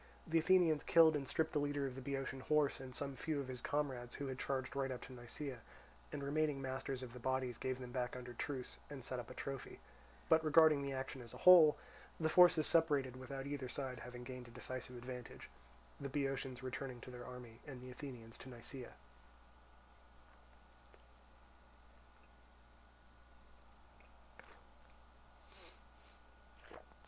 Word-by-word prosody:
The 165 0 +3
Athenians 165 -2 +5
killed 160 -2 +6
and 140 -2 -2
stripped 160 - 0
the 150 - +2
leader 145 -1 0
of 135 - -3
the 130 - -7
Boeotian 135 0 -3
horse 150 +1 +2
and 130 -1 -8
some 140 -1 -3
few 155 +2 -2
of 140 - -3
his 125 -2 -5
comrades 130 -4 -2
who 140 - -4
had 130 -1 -4
charged 130 -1 -2
right 135 -1 0
up 125 -1 -4
to 130 - -9
Nisaea, 125 +2 -6 0.5
and 140 - -4
remaining 150 0 +1
masters 135 0 -3
of 120 -2 -8
the 125 - -8
bodies 130 0 -1
gave 130 -1 -1
them 125 -1 -7
back 125 -1 -2
under 125 -1 -7
truce, 130 +1 -4
and 140 -3 -7
set 130 -2 -3
up 120 - -7
a 130 - -9
trophy; 135 -1 -5 0.5
but 160 0 +5
regarding 155 -1 +6
the 140 0 -2
action 130 0 -4
as 120 -2 -10
a - - -11
whole 170 -5 +10 0.4
the 160 -1 +2
forces 175 -3 +7
separated 145 -6 +3
without 135 +1 -6
either 140 -3 -3
side 130 -2 -4
having 125 +1 -8
gained 125 -1 -7
a - - -12
decisive 125 +1 -5
advantage, 125 0 -8 0.5
the 140 - -4
Boeotians 135 -2 -2
returning 130 -1 -4
to 125 - -9
their 120 0 -8
army 125 -2 -9
and 135 -3 -7
the 125 0 -9
Athenians 125 -4 -9
to 130 - -9
Nisaea. 120 +1 -8
135 Hz, 155 wpm, -38 LUFS, 125-145 Hz, 0.5 s, whole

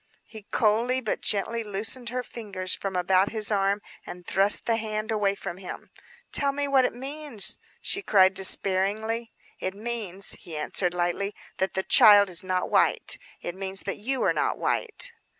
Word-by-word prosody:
He 220 -3 -12
coldly 230 +4 +2
but 230 -5 -3
gently 225 +3 0
loosened 220 +4 -1
her 250 +1 -3
fingers 195 -7 -4
from 195 -1 -3
about 185 +2 +3
his 220 -1 -1
arm 200 0 +1 0.2
and 180 0 -10
thrust 195 +3 +1
the 230 -1 +1
hand 215 0 -3
away 205 -2 +1
from 175 -2 -6
him. 185 -1 -9 0.4
"Tell 280 -1 +2
me 285 +1 -2
what 270 -2 +4
it - - -1
means!" 275 -3 -4 0.2
she 400 - 0
cried 190 - +4
despairingly. 200 +4 +2 0.3
"It 185 +1 -3
means," 210 -4 -3
he 160 -3 -8
answered 175 +4 0
lightly, 180 +3 -1 0.2
"that 190 - -1
the 190 - 0
child 205 -2 +7
is 180 +2 +1
not 185 -1 -1
white; - - +2 0.2
it 175 - -4
means 190 0 -4
that 195 - -4
you 260 +5 -1
are - - +3
not - - 0
white." 485 +1 -2
205 Hz, 170 wpm, -26 LUFS, 190-230 Hz, 0.4 s, child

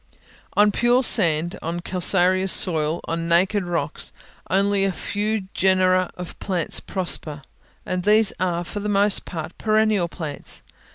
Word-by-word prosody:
On 210 0 +3
pure 240 +5 +2
sand, 170 -7 +5
on 170 +2 -4
calcareous 185 +1 +2
soil, 160 -2 +2
on 165 0 -4
naked 185 +4 +2
rocks, 165 -4 -2 0.4
only 195 +1 +1
a 195 - +1
few 210 +3 -3
genera 185 -1 +2
of 180 -1 -9
plants 180 -4 -2
prosper, 155 -6 -3 0.4
and 185 0 -3
these 210 +2 +3
are, 175 -1 -1
for 205 +4 -6
the 210 +1 -4
most 205 0 +2
part, 160 -4 -7
perennial 215 -4 +1
plants. 155 -4 -6
185 Hz, 135 wpm, -22 LUFS, 170-205 Hz, 0.4 s, sand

